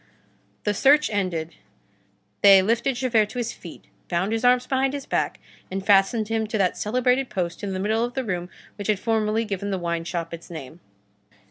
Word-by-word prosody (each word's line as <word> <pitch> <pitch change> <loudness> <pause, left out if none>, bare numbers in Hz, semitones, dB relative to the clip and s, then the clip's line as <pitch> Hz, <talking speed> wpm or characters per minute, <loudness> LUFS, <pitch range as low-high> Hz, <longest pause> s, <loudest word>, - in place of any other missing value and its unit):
The 210 - +1
search 285 +7 +4
ended, 175 -5 -2 0.9
they 195 -1 +8
lifted 235 +5 +1
Javert 235 -4 +2
to 250 - -9
his 240 -1 -2
feet, 170 - -12 0.2
bound 185 +4 0
his 225 +1 -1
arms 250 0 +4
behind 265 +1 0
his 280 - -6
back, - - -1 0.3
and 190 +1 -4
fastened 205 +2 +3
him 225 0 -1
to 220 - -2
that 190 -3 +1
celebrated 250 +4 +1
post 175 -3 -3
in 195 -1 -3
the 185 - -3
middle 220 +4 +1
of 245 0 -4
the 265 - -1
room 180 -5 -3 0.3
which 205 - -5
had 215 -2 +2
formerly 220 +1 0
given 200 -1 -3
the 195 - -1
wine 170 -1 -2
shop 170 -1 -4
its 170 0 -9
name. 160 -1 -9
210 Hz, 195 wpm, -24 LUFS, 185-240 Hz, 0.9 s, they